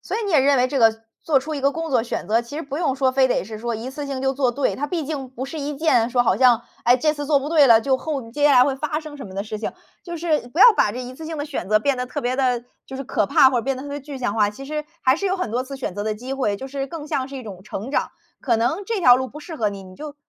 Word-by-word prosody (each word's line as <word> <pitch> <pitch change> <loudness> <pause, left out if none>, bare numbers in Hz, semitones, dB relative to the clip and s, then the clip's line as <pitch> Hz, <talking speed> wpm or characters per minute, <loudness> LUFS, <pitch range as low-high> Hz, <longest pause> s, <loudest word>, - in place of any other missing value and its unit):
所 - - -4
以 460 - -2
你 400 - -2
也 300 -5 +5
认 280 +1 +4
为 250 +1 +2
这 275 - -1
个 225 -1 +3 0.2
做 305 -4 +2
出 310 +3 -5
一 - - -4
个 280 +1 +3
工 325 -1 -4
作 245 -4 +3
选 235 - -4
择， 225 +2 +3
其 240 +5 -9
实 325 - -3
不 285 +2 -5
用 290 -7 0
说 265 -1 +2
非 260 0 +3
得 245 - 0
是 215 +1 -8
说 235 0 -3
一 235 +4 -5
次 285 +1 -6
性 270 -1 -4
就 265 0 +1
做 265 -2 +1
对。 280 0 0
它 290 - -2
毕 325 -1 -3
竟 275 -3 -4
不 260 +1 -6
是 305 +3 -7
一 290 0 -4
件 245 -7 +2
说 245 0 +2
好 - - +2
像， 245 -3 +4 0.2
哎， 245 +1 +6
这 305 +4 +1
次 290 -1 -5
做 290 -1 +4
不 290 - -4
对 305 -4 +5
了， 230 -2 +7
就 265 +2 +1
后 275 -7 -4
接 290 +4 -1
下 290 - +5
来 250 -1 +7
会 270 0 0
发 305 +2 -2
生 305 -2 -10
什 270 - -8
么 190 - -11
的 200 - -2
事 215 0 -6
情。 - - -4 0.3
就 345 -1 -6
是 310 -6 -1
不 320 +9 -3
要 - - +11
把 205 - +3
这 250 - -5
一 250 +1 -8
次 315 +4 -9
性 320 -1 -5
的 290 - -3
选 190 -10 -5
择 215 0 +4
变 280 +3 0
得 250 - -2
特 - - -4
别 250 +2 -1
地， 250 -3 +1 0.2
就 265 - -7
是 270 - -5
可 210 - 0
怕 260 - +6
或 250 - +1
者 - - -2
变 270 0 -1
得 260 - -7
特 285 - -8
别 285 +1 -5
具 280 0 -8
象 235 -5 -2
化。 210 -2 +3
其 210 +6 -9
实 300 +1 -4 0.2
还 260 +2 +4
是 400 - -2
有 380 0 0
很 365 - -3
多 245 +3 -1
次 275 +1 -8
选 255 -9 -5
择 205 +1 -4
的 215 - -1
机 250 +5 -7
会， 230 -7 -1
就 265 - -7
是 275 0 -4
更 305 +1 -7
像 265 -2 -2
是 275 - -8
一 255 - -7
种 190 -4 -9
成 215 +4 -6
长， - - 0 0.3
可 235 -4 +1
能 315 - 0
这 450 -4 -1
条 250 -7 +7
路 260 0 -3
不 300 - -11
适 320 0 -8
合 215 -4 +1
你， 200 -1 -7
你 185 0 -13
就 295 -1 -8
265 Hz, 365 characters per minute, -22 LUFS, 240-290 Hz, 0.3 s, 要